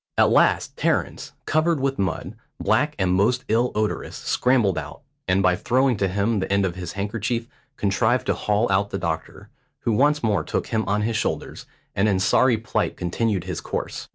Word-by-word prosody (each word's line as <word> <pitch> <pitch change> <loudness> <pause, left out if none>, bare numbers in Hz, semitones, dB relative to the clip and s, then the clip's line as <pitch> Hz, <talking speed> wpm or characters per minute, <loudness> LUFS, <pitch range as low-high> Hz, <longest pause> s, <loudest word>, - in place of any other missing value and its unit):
At - - +4
last - - +3
Terence, - - -1
covered 155 0 +1
with 135 0 -1
mud, 95 0 -2 0.3
black 150 0 +1
and 95 -2 +1
most 115 +7 +2
ill 120 +3 +2
odorous, 105 0 -2
scrambled 120 -7 +1
out, 80 - -6 0.3
and, 95 +1 +2
by 90 -2 +4
throwing 125 +4 +2
to 95 - +1
him 100 +4 0
the 95 - -3
end 100 0 +3
of 90 - -1
his 90 -1 -6
handkerchief, 110 +4 -2 0.3
contrived 110 +5 +1
to - - +1
haul 105 +2 0
out 100 +1 +2
the 95 - -3
doctor, 85 +4 -5 0.3
who 115 - 0
once 145 +5 +2
more 105 -4 +1
took - - -2
him 110 0 -1
on 105 +1 +1
his 110 0 0
shoulders, - - -3 0.3
and 100 +2 +2
in 95 -2 +1
sorry 120 +5 +3
plight 110 -1 -2
continued 95 +2 -1
his 90 -2 -5
course. - - -5
105 Hz, 185 wpm, -23 LUFS, 95-120 Hz, 0.3 s, At